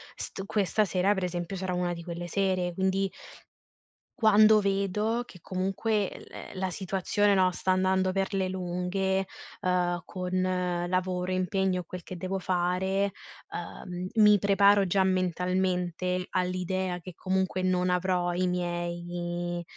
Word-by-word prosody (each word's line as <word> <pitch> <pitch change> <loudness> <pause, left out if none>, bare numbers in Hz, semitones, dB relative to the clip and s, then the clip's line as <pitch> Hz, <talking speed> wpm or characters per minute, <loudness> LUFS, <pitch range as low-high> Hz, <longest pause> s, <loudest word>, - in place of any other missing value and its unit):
st 195 - -6
questa 205 0 +1
sera, 190 +2 +2
per 190 -2 -3
esempio, 175 +1 -4
sarà 185 -1 -3
una 180 0 0
di 170 -1 -7
quelle 175 0 -5
sere, 185 -1 0
quindi 190 +1 0 1.1
quando 215 -1 +6
vedo 200 +4 0
che 180 - -13
comunque 195 +2 -1
l - - -10
la 185 -1 -1
situazione 195 +2 +1
no, 185 -1 +4
sta 185 - -4
andando 185 0 +3
per 195 +1 -1
le 190 -1 0
lunghe, 190 +1 -1 0.3
uhm, 180 -1 +1
con 180 -1 -1
lavoro, 185 0 -1
impegno 185 0 0
e - - -14
quel 180 +1 -7
che 180 +1 -8
devo 185 +2 -3
fare, 185 +2 0 0.4
uhm, 180 +1 -6
mi 210 -2 +6
preparo 200 0 +4
già 190 +2 +3
mentalmente 180 0 0
all'idea 185 0 -1
che 180 +1 -10
comunque 190 +1 -1
non 180 0 +1
avrò 180 -1 +1
i 180 +1 +1
miei 175 0 -3
185 Hz, 135 wpm, -28 LUFS, 180-190 Hz, 1.1 s, quando